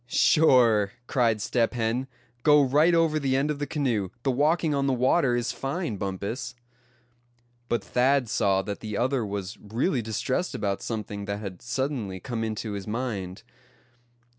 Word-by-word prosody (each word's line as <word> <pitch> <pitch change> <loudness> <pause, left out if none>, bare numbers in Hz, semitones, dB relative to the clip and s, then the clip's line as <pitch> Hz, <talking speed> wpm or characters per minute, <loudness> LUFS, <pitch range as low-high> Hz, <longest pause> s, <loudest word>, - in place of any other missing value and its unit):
"Sure," 120 -8 +4
cried 115 -4 +1
Step 115 +2 0
Hen, 120 +3 -1 0.3
"go 150 +3 +6
right 150 +6 +4
over 165 -2 +2
the 135 -2 0
end 140 +3 +1
of 145 - -4
the 145 - -2
canoe; 120 - -1
the 135 - +2
walking 150 +4 +2
on 140 -1 0
the 135 - +2
water 130 +1 +2
is 120 -1 -1
fine, 135 - -3
Bumpus." 100 +6 -4 1.1
But 120 -4 0
Thad 130 +4 +2
saw 100 -3 +1
that 100 0 -5
the 105 -2 -5
other 130 0 +1
was 100 -1 -5
really 120 - -1
distressed 120 - -2
about 100 -1 -2
something 105 -3 -4
that 100 0 -3
had 100 -4 -7
suddenly 120 -6 -3
come 115 +4 -4
into 110 0 -3
his 100 -1 -5
mind. 105 -4 -4
120 Hz, 160 wpm, -26 LUFS, 105-135 Hz, 1.1 s, go